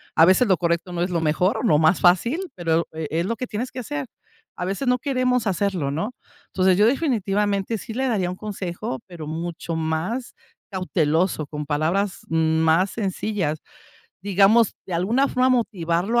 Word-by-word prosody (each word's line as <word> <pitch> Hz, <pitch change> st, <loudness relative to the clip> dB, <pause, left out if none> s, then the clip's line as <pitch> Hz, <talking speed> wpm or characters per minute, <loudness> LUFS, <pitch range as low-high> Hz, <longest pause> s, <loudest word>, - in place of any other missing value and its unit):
a 160 Hz, -, +7 dB
veces, 190 Hz, +7 st, +4 dB
lo 190 Hz, -, +4 dB
correcto 170 Hz, +1 st, -1 dB
no 170 Hz, -, -2 dB
es 180 Hz, -, -2 dB
lo 170 Hz, -2 st, 0 dB
mejor 165 Hz, +7 st, +1 dB
o -, -, -4 dB
lo 200 Hz, -11 st, +4 dB
más 160 Hz, +3 st, +3 dB
fácil, 240 Hz, -, +3 dB
pero, 165 Hz, -1 st, +1 dB
e 160 Hz, -1 st, -4 dB
es 165 Hz, +2 st, 0 dB
lo 230 Hz, +4 st, -1 dB
que 255 Hz, -, -4 dB
tienes 235 Hz, +4 st, -4 dB
que -, -, -6 dB
hacer, 145 Hz, -, -4 dB, 0.5 s
a 180 Hz, -, -3 dB
veces, 195 Hz, +8 st, -2 dB
no 250 Hz, 0 st, +3 dB
queremos 255 Hz, -3 st, 0 dB
hacerlo, 185 Hz, -6 st, 0 dB
¿no?, 165 Hz, -, -2 dB, 0.4 s
entonces, 185 Hz, -1 st, +2 dB
yo 210 Hz, -, +5 dB
definitivamente 210 Hz, -, 0 dB
sí 220 Hz, +2 st, -8 dB
le 265 Hz, +3 st, -1 dB
daría 195 Hz, -6 st, 0 dB
un 180 Hz, -, -4 dB
consejo, 185 Hz, -10 st, -5 dB
pero 170 Hz, -5 st, -8 dB
mucho 165 Hz, +1 st, -4 dB
más 160 Hz, +10 st, -2 dB, 0.4 s
cauteloso, 170 Hz, -3 st, 0 dB
con 150 Hz, 0 st, -5 dB
palabras 165 Hz, +7 st, 0 dB
más 160 Hz, +3 st, +2 dB
sencillas, 195 Hz, -6 st, -2 dB, 0.6 s
digamos, 200 Hz, +3 st, +4 dB
de 185 Hz, -, -7 dB
alguna 230 Hz, +11 st, +2 dB
forma 255 Hz, +1 st, +2 dB
motivarlo 210 Hz, -2 st, +1 dB
185 Hz, 175 wpm, -23 LUFS, 165-220 Hz, 0.6 s, a